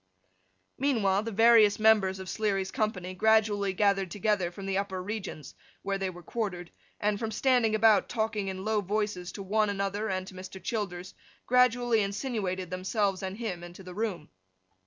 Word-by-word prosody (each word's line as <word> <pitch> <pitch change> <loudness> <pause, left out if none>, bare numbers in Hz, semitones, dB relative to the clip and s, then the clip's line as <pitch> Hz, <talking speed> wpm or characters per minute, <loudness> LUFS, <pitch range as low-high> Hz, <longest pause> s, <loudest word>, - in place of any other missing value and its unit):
Meanwhile, 215 -8 +2
the 225 +1 -5
various 225 -1 +6
members 215 -3 +4
of 190 0 -8
Sleary's 195 -3 -1
company 205 -6 -2
gradually 210 -1 +3
gathered 195 -1 +1
together 205 -2 0
from 195 +3 -9
the 195 0 -1
upper 190 -2 -3
regions, 195 -5 -6 0.3
where 195 0 -2
they 190 -1 -1
were 175 -1 -11
quartered, 180 -5 -4 0.3
and, 205 0 0
from 225 - -2
standing 230 -1 +2
about, 215 -2 +4
talking 220 -3 -1
in 190 0 -5
low 215 -1 +1
voices 205 -2 -2
to 200 - -6
one 210 +2 +1
another 200 +2 -2
and 185 -1 -2
to 190 - -11
Mr. 185 +1 -9
Childers, 195 -5 -4 0.3
gradually 245 -2 +3
insinuated 200 -4 -3
themselves 190 +1 -1
and 190 +1 -5
him 195 -7 -4
into 175 +2 -10
the 180 0 -9
room. 190 -6 -3
200 Hz, 165 wpm, -29 LUFS, 190-220 Hz, 0.3 s, various